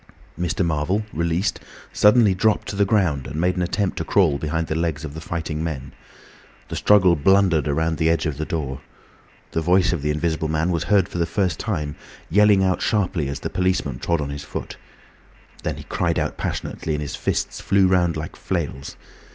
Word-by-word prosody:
Mr. 90 +1 -1
Marvel, 85 +6 0
released, 85 +5 0 0.3
suddenly 105 -1 +5
dropped 105 +3 +1
to - - -4
the 100 0 +3
ground 85 -11 +1
and 75 +4 -5
made 90 +2 +1
an 90 - -1
attempt 95 +2 -1
to - - -1
crawl 80 -8 +2
behind 80 +2 -1
the 80 - -3
legs 80 -2 -2
of 70 - -7
the 80 - -7
fighting 80 -1 -3
men. 75 -6 -4 0.8
The - - -4
struggle 95 -4 +5
blundered 85 -2 +3
round 80 +2 0
the 80 - +3
edge 85 - +1
of 75 -3 -2
the 80 - -2
door. 70 -6 -4 0.7
The 80 - -1
voice 90 +2 +3
of 85 - -2
the 75 - -1
Invisible 80 +1 -1
Man 80 +3 0
was 80 -3 -1
heard 95 0 +3
for 90 - -5
the 85 - +1
first 95 -4 -1
time, 75 -9 -3 0.4
yelling 105 0 +5
out 95 -1 +1
sharply, 95 -8 0
as 70 0 -5
the - - -4
policeman 90 -9 0
trod 85 -2 0
on 70 -1 -3
his 70 0 -6
foot. - - -6 0.9
Then - - -3
he - - -8
cried - - -1
out - - -1
passionately 80 - -3
and 75 - -3
his 70 - -5
fists - - -2
flew 100 -1 +3
round 90 -3 +2
like 75 0 -6
flails. 70 +1 -4
85 Hz, 200 wpm, -22 LUFS, 75-95 Hz, 0.9 s, suddenly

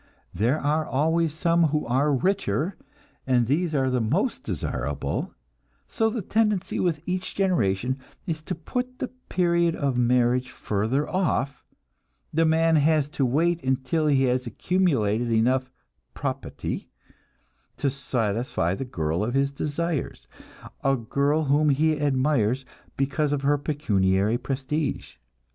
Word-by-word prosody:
There 115 - +1
are 150 +2 +1
always 160 +3 +1
some 170 +2 +2
who 150 0 0
are 135 +5 +2
richer, 185 +3 0 0.5
and 125 -2 +3
these 155 +6 0
are 135 -2 +2
the 125 -1 +1
most 145 - 0
desirable; 75 - -3 0.5
so 225 0 +1
the 220 -2 -3
tendency 210 -2 0
with 165 -4 0
each 185 +1 -3
generation 130 - +1 0.3
is 160 -4 -3
to - - -3
put 250 +10 -4
the 255 - -3 0.2
period 170 -2 +2
of 135 -4 0
marriage 125 +1 +2
further 115 +4 -1
off; 140 -7 -1 0.7
the 165 +1 +3
man 160 0 +3
has 150 -1 +3
to 140 -3 0
wait 165 +6 +1
until 130 +4 0
he 135 -2 +3
has 125 -1 +1
accumulated 120 - +1
enough 125 +3 +2 0.5
"proputty" - - -4 0.9
to 140 - 0
satisfy 115 -8 -1
the 135 - -4
girl 80 -7 -1
of 120 +4 -2
his 140 0 +2
desires 150 +1 -3 0.6
a 135 0 +3
girl 140 +6 0
whom 150 +1 +3
he 150 +2 +2
admires 130 -3 +1 0.3
because 140 +2 0
of 145 -1 -1
her 145 +1 +3
pecuniary 105 -7 +1
prestige. 135 +3 -3
140 Hz, 130 wpm, -25 LUFS, 125-160 Hz, 0.9 s, and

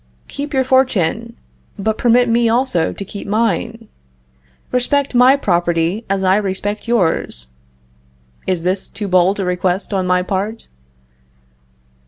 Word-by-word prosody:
Keep 290 +1 -6
your 265 - +3
fortune, 235 -4 +1 0.4
but 220 +2 -2
permit 245 +1 +4
me 230 0 +2
also 235 -8 +1
to 200 - -7
keep 200 +2 -8
mine. 225 +1 -1 0.8
Respect 275 +3 0
my 250 +2 +6
property 175 -2 0
as 195 0 0
I 190 +1 +4
respect 205 +2 -3
yours. 165 - 0 1.0
Is 180 -3 -1
this 185 +2 -1
too 210 - -5
bold 185 +2 +2
a 195 - -1
request 180 +3 -1
on 190 -2 0
my 180 0 +2
part? 200 +4 -3
205 Hz, 130 wpm, -17 LUFS, 185-235 Hz, 1.0 s, my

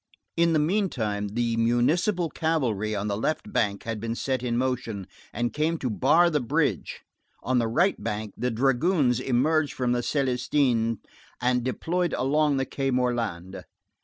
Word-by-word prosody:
In 170 0 +3
the - - +3
meantime, 150 - 0
the 115 +2 -1
municipal 155 - +1
cavalry 120 - -1
on 100 +1 -2
the 100 - -1
left 155 - -2
bank 100 -2 0
had 115 -1 -4
been 115 +1 -3
set 130 0 -2
in 120 -2 -1
motion, 120 -6 -2 0.3
and 120 +2 -2
came 160 +2 0
to 130 -6 -2
bar 160 +10 +4
the 150 - +2
bridge, 120 - -1 0.4
on 130 0 +1
the 115 - +1
right 175 - +1
bank 105 -2 -3
the 125 - -1
dragoons 135 +2 +2
emerged 145 +5 +1
from 125 -2 -1
the 120 - +1
Célestins 125 -2 +1 0.4
and 125 0 +1
deployed 175 +7 -1
along 145 +2 +2
the 135 - 0
Quai 135 0 -2
Morland. 115 -8 -2
125 Hz, 160 wpm, -26 LUFS, 115-150 Hz, 0.4 s, bar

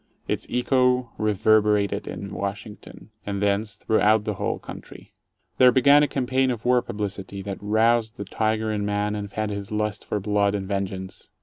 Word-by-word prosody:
Its - - -2
echo 125 -1 +2
reverberated 105 -1 +2
in 100 0 -6
Washington, 105 +2 -7
and 100 -1 -3
thence 100 +1 0
throughout 110 0 +2
the 105 - -2
whole - - -2
country. - - -11 0.5
There 125 -1 +8
began 140 +4 +6
a 150 - +3
campaign 130 -1 0
of 120 -3 -4
war 125 0 +4
publicity 100 -3 -5
that 100 0 -6
roused 110 +2 +2
the 100 - -5
tiger 110 +2 -1
in 105 -1 -2
man 105 0 -1
and 100 -1 -5
fed 110 +1 -3
his 100 0 -6
lust 105 -1 -2
for 105 - -2
blood 100 0 +1
and 95 -2 -4
vengeance. 95 -1 -4
105 Hz, 170 wpm, -24 LUFS, 100-115 Hz, 0.5 s, There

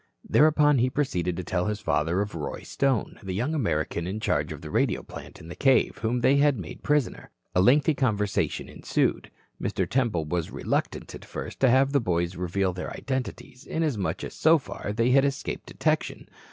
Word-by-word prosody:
Thereupon 150 -2 +4
he 125 +2 +3
proceeded 90 - -1
to 90 - -3
tell 90 +2 -1
his 105 0 -2
father 85 +4 0
of 105 +1 -3
Roy 75 -4 -5
Stone, 135 -6 -1
the 95 -3 -4
young 125 +10 -1
American 85 - -1
in 100 +4 -3
charge 110 - 0
of - - -7
the - - -8
radio - - +1
plant - - -10
in 80 - -11
the 85 - -8
cave, 135 -2 +3
whom 120 +2 0
they 135 +3 +4
had 145 -2 +4
made 85 -6 -8
prisoner. 150 -4 0 0.2
A 90 - +3
lengthy 140 - +4
conversation 105 -7 0
ensued. - - -1 0.3
Mr. - - -1
Temple 115 - 0
was 85 +1 -2
reluctant - - -2
at - - -9
first - - -7
to 135 - +5
have 135 +2 +4
the 140 -2 +3
boys 85 -3 -1
reveal 90 +1 -1
their 90 - -5
identities 130 0 -5
inasmuch 145 - -1
as - - -6
so 160 +1 +5
far 130 -6 -6
they 115 +3 +1
had 135 +1 +5
escaped 140 -1 -3
detection. - - -1
115 Hz, 190 wpm, -26 LUFS, 90-135 Hz, 0.3 s, to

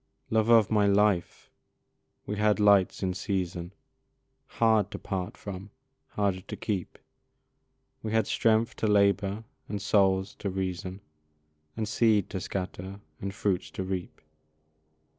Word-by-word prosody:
Love 110 0 +2
of 115 -3 +6
my 105 -2 +4
life! 100 -4 +1 0.7
we 105 - -3
had 105 0 +3
lights 100 -2 +4
in 90 -1 0
season 90 -2 -3 0.8
Hard 110 -3 +2
to - - -6
part 95 +2 -4
from, 100 0 -7 0.4
harder 100 -3 -1
to 95 - -7
keep 100 -5 -3 1.0
We 110 - -4
had 110 0 +2
strength 115 0 +2
to 110 - 0
labour 100 0 +2 0.3
and 105 - -3
souls 95 -1 +2
to 100 - -2
reason, 95 0 -4 0.8
And 110 - -1
seed 110 -3 +2
to 95 - -3
scatter 95 +1 -5 0.2
and 100 - -3
fruits 95 -2 -1
to 95 - -5
reap. 95 -1 -5
100 Hz, 130 wpm, -28 LUFS, 95-105 Hz, 1.0 s, of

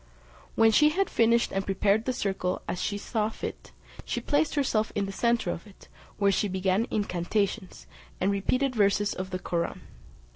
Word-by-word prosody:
When 225 0 +5
she 300 +7 +5
had 385 +5 0
finished 235 +1 +3
and 195 - 0
prepared 200 +3 +1
the 255 - +1
circle 190 -6 -2
as 180 - -3
she 205 - -1
thought 215 +1 -2
fit, - - -7 0.3
she - - -2
placed 300 +1 +1
herself 230 -7 +1
in 200 - 0
the 195 - -5
centre 235 -2 +1
of 170 - -7
it, 200 - -17 0.3
where 200 -1 +3
she 205 - +1
began 190 +4 0
incantations, 200 0 -2 0.3
and 190 +2 +2
repeated 255 +7 0
verses 205 -1 +2
of 185 0 -5
the 185 - -3
Koraun. 170 -2 -3
205 Hz, 175 wpm, -27 LUFS, 190-230 Hz, 0.3 s, When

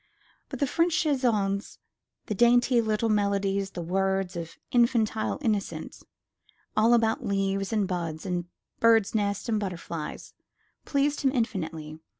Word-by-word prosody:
But - - -5
the 285 - +3
French 335 +5 +1
chansons, 220 -9 0 0.5
the - - -2
dainty 240 +3 +4
little 220 0 0
melodies 200 -2 0
with 175 - -4
words 190 +1 0
of 165 -1 -6
infantile 235 -3 +2
innocence, 210 -5 -2 0.7
all 225 +3 +5
about 225 -1 +1
leaves 195 0 -1
and 210 -3 +1
buds, 170 -3 -4
and 180 -2 -2 0.3
birds' 225 -3 +4
nests 200 -1 -1
and 220 -2 +1
butterflies, 170 -5 -6 0.5
pleased 285 0 +1
him 270 -2 +3
infinitely. 160 - -3
205 Hz, 130 wpm, -27 LUFS, 190-235 Hz, 0.7 s, all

